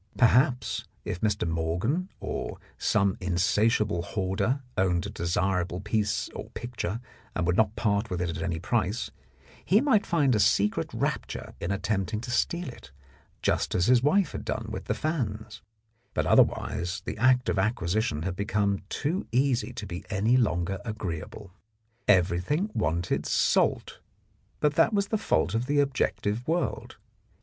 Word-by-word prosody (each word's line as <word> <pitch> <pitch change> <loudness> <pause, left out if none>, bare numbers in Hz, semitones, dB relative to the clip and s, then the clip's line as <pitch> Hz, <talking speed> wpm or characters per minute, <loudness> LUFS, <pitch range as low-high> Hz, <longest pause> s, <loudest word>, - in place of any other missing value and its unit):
Perhaps 125 0 +3 0.2
if 90 - -4
Mr. 105 -4 +1
Morgan 90 - -1
or - - -4 0.2
some 100 -2 +2
insatiable 100 +2 +2
hoarder 95 +9 -1
owned 90 -3 +1
a - - -5
desirable 90 +1 0
piece 105 +1 0
or - - -8
picture 115 -4 -4 0.4
and 90 - 0
would 90 +1 +2
not 110 0 +2
part 105 0 0
with 90 - -2
it 90 -1 -1
at 80 0 -5
any 85 0 -1
price, 105 +4 -1 0.5
he 200 - +4
might 255 -6 +3
find 145 -6 +3
a 105 - +2
secret 105 0 +2
rapture - - -3
in 85 - -2
attempting 100 +1 -1
to 120 0 -5
steal 170 +8 0
it, 70 - -13 0.5
just - - +1
as 90 - +3
his 125 +1 +5
wife 160 +5 +3
had - - -5
done - - -3
with - - -5
the - - -1
fans, 110 -8 -3 0.5
but - - +1
otherwise 90 +3 +2
the - - -5
act 125 +1 +4
of 95 - +1
acquisition 95 -5 0
had 90 0 -2
become 100 0 0
too 165 +7 -2
easy 130 0 +1
to 110 -4 -6
be 90 -2 -6
any 105 +4 +2
longer 95 -5 +1
agreeable. 105 -3 -5 0.6
Everything 95 - +2
wanted 85 +3 0
salt, - - +1 0.6
but 150 -1 +3
that 215 +8 +3
was 200 -1 +1
the 220 - +1
fault 85 - +1
of 115 +3 -1
the 145 0 +2
objective 125 -5 0
world. 170 +2 -2
105 Hz, 155 wpm, -27 LUFS, 90-125 Hz, 0.6 s, his